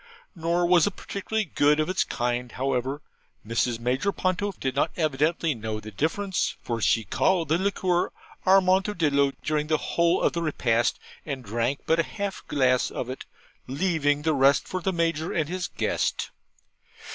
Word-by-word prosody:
Nor 170 +1 +1
was 175 +1 +5
it 205 - -3
particularly 215 +2 -3
good 150 -2 +2
of 155 - +1
its 185 +1 +1
kind; 120 -1 -2
however, 135 +2 -2 0.4
Mrs. 115 +1 0
Major 125 +11 0
Ponto 185 +2 -1
did 130 -1 -2
not - - +2
evidently 155 +1 +1
know 110 -2 -4
the 110 0 -9
difference, 175 - -1
for 115 -2 -3
she 115 +2 +3
called 165 - +1
the 160 +3 +2
liquor 185 -2 0 0.3
Amontillado 185 -7 +3
during 150 -1 0
the 155 0 +2
whole 170 +3 +1
of - - +2
the 170 - -2
repast, 120 -7 +1 0.3
and 140 -4 -5
drank 120 +6 -1
but 165 +1 +2
half 200 +2 -5
a - - -38
glass 130 -3 +2
of 125 - -4
it, 130 - -7 0.4
leaving 145 -1 0
the 160 0 +2
rest 135 -3 +4
for 185 - -3
the 190 - 0
Major 165 -2 -1
and 155 -3 0
his 180 +1 -3
guest. - - -1
155 Hz, 165 wpm, -26 LUFS, 130-180 Hz, 0.4 s, was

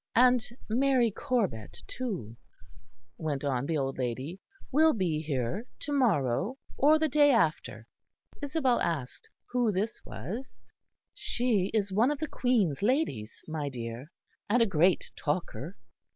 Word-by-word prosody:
"And 250 0 +5 0.2
Mary 250 0 +3
Corbet, 195 - -2
too," 190 - -5 0.8
went 150 -4 -2
on 135 -1 0
the 165 - 0
old 135 -1 -2
lady, 130 +8 -3 0.3
"will 315 +3 +5
be 175 -7 0
here 150 - -2
to 295 - -5
morrow 210 - +1 0.2
or 300 +3 +5
the 315 0 +1
day 290 0 +5
after." 155 - +1 0.6
Isabel 285 -4 +1
asked 150 -7 -3 0.2
who 245 -3 +2
this 210 +4 -2
was. 235 +8 -7 0.5
"She 225 -6 +1
is 205 -3 0
one 225 +7 +4
of 295 - -1
the 310 +2 -3
Queen's 225 - +1
ladies, 205 - 0
my 155 -3 -3
dear; 120 +1 -6 0.4
and 240 +4 +4
a 230 - +5
great 180 -2 +2
talker." 150 - -3
195 Hz, 135 wpm, -29 LUFS, -, 0.8 s, And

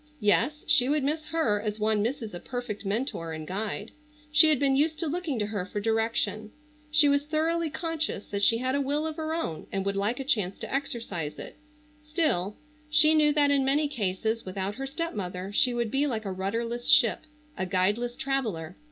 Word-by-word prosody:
Yes, 240 +8 +2
she 275 -4 +5
would 295 -1 +1
miss 305 +3 -1
her 270 -11 +1
as 215 0 -3
one 215 0 +2
misses 225 -1 -3
a 175 - -5
perfect 235 -4 -5
mentor 200 - -2
and 155 0 -6
guide. 205 +4 -4 0.4
She 310 +1 +7
had 305 - +4
been 275 -1 +3
used 310 +3 +2
to 335 - -2
looking 320 -3 -2
to 210 - 0
her 205 -3 -3
for 200 +2 -5
direction. 220 0 0 0.4
She 300 0 +5
was 285 0 +2
thoroughly 320 +2 0
conscious 320 - -2
that 200 -1 -4
she 230 +3 +5
had 255 +2 -1
a 280 - +1
will 290 +3 0
of 315 -1 -4
her 315 0 -2
own 165 - -4
and 195 0 -2
would 200 0 -1
like 205 +6 0
a - - -2
chance 210 -8 0
to - - -6
exercise 225 - -3
it, - - -9 0.5
still, 300 - 0 0.3
she 305 +1 +6
knew 305 -1 +4
that 290 -1 +4
in 280 -1 +3
many 285 +3 +2
cases 220 -3 -2
without 190 +1 -3
her 270 +4 -5
stepmother 200 - -4
she 250 - +3
would 235 -2 -2
be 280 +3 +2
like 220 -5 -3
a 195 - -2
rudderless 230 +6 -3
ship, 300 0 +5 0.3
a 185 - -3
guideless 205 +6 0
traveller. 220 -12 -2
240 Hz, 200 wpm, -27 LUFS, 205-295 Hz, 0.5 s, She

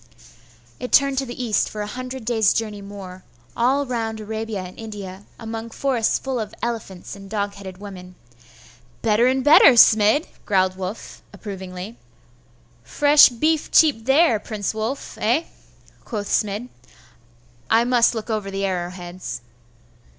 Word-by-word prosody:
It 250 - -6
turned 275 -1 +4
to 270 - -4
the 245 +1 -5
east 220 -3 +1
for 210 -1 -5
a - - -4
hundred 255 +2 -7
days' 220 -3 +3
journey 215 -2 -3
more, 195 -2 -10 0.3
all 270 +4 +2
round 225 -3 -3
Arabia 220 -1 -4
and 180 0 -10
India, 205 -3 -8
among 225 0 -6
forests 245 -2 0
full 265 -2 -3
of 215 -2 -5
elephants 220 -7 -5
and 195 -1 -12
dog 205 -1 -2
headed 190 -2 -10
women. 185 -2 -10 0.9
'Better 225 +2 +3
and 260 0 +1
better, 290 -2 +8
Smid!' 220 +4 +5 0.2
growled 185 -2 +1
Wulf, 190 +3 -7
approvingly. 190 +1 -8 0.8
'Fresh 290 - +6
beef 305 +6 0
cheap 280 -9 +4
there, 270 -4 +4
Prince 210 -2 -4
Wulf, 220 +5 -5
eh?' 240 +10 +2 0.6
quoth 205 -3 -5
Smid; 210 +3 -1 1.0
'I 225 +1 +4
must 240 -1 +3
look 225 +1 -4
over 210 -2 -2
the 195 0 -2
arrow 180 -2 -2
heads. 180 -3 -7
220 Hz, 145 wpm, -22 LUFS, 200-245 Hz, 1.0 s, better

